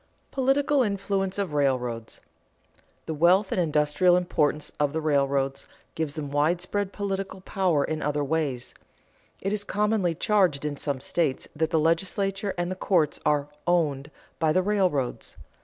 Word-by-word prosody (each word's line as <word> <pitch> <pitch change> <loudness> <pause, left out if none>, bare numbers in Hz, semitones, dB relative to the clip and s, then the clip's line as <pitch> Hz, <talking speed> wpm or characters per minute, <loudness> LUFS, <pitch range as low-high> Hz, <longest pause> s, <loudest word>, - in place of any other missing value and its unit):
[Sidenote: - - -40
Political 275 +2 +2
influence 195 -3 -1
of 195 -6 -2
railroads] 125 -5 -1 0.8
The 160 - -3
wealth 180 +6 +3
and 180 - +1
industrial 155 +3 +3
importance 150 -4 0
of 145 -1 +1
the 160 - 0
railroads 140 -2 0 0.3
give 155 -2 -3
them 145 -3 -5
widespread 175 +7 0
political 195 -2 -4
power 185 -6 +1
in 155 +1 -3
other 145 0 0
ways. 140 -4 -2 0.7
It 195 +2 -1
is 210 -1 -1
commonly 205 -4 0
charged 180 -8 +2
in 150 -1 -2
some 140 -2 -3
states 150 -3 -1
that 160 +1 0
the 165 - +1
legislature 195 +5 0
and 175 +1 -1
the - - -2
courts 175 -5 +1
are 145 -1 +1 0.2
"owned" 150 -5 +1 0.3
by 160 -1 +3
the 185 +4 +2
railroads. 185 -11 0
165 Hz, 150 wpm, -26 LUFS, 145-195 Hz, 0.8 s, wealth